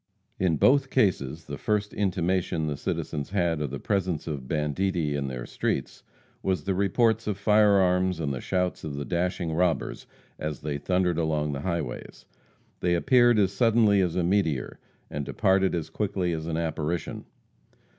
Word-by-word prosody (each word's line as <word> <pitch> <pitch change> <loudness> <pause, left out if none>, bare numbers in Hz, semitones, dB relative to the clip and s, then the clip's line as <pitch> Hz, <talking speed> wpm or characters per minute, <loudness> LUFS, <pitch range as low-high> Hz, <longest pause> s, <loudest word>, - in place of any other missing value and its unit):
In 90 -4 +2
both 135 - +4
cases 80 - 0
the 70 -2 -7
first 105 -1 -1
intimation 90 -4 0
the 75 -1 -2
citizens 70 +1 -3
had 85 -5 0
of 75 - -2
the 70 +1 -5
presence 95 -6 -1
of 70 -5 -5
banditti 80 +1 0
in 70 -1 -2
their 65 -2 -5
streets - - -3 0.4
was 95 -6 -1
the 95 - 0
reports 110 +4 +2
of 105 -3 -1
fire 105 0 +4
arms 90 -2 +2
and 70 -4 -1
the 65 - -5
shouts 90 -1 -1
of 75 -2 -5
the 70 0 -4
dashing 90 -1 -1
robbers 85 0 0 0.3
as 75 -3 -4
they 75 -1 -3
thundered 90 +2 +1
along 75 -2 0
the 70 -1 -4
highways. 85 -6 -4 0.5
They 90 -1 +2
appeared 120 +3 +4
as 95 -3 +3
suddenly 110 -2 +4
as 90 -3 0
a 90 - +1
meteor, 85 -8 0 0.3
and 75 - -3
departed 95 +5 +2
as 80 -2 -4
quickly 95 -3 -1
as 80 0 -4
an 80 -1 -2
apparition. 80 0 -3
90 Hz, 165 wpm, -27 LUFS, 75-95 Hz, 0.5 s, both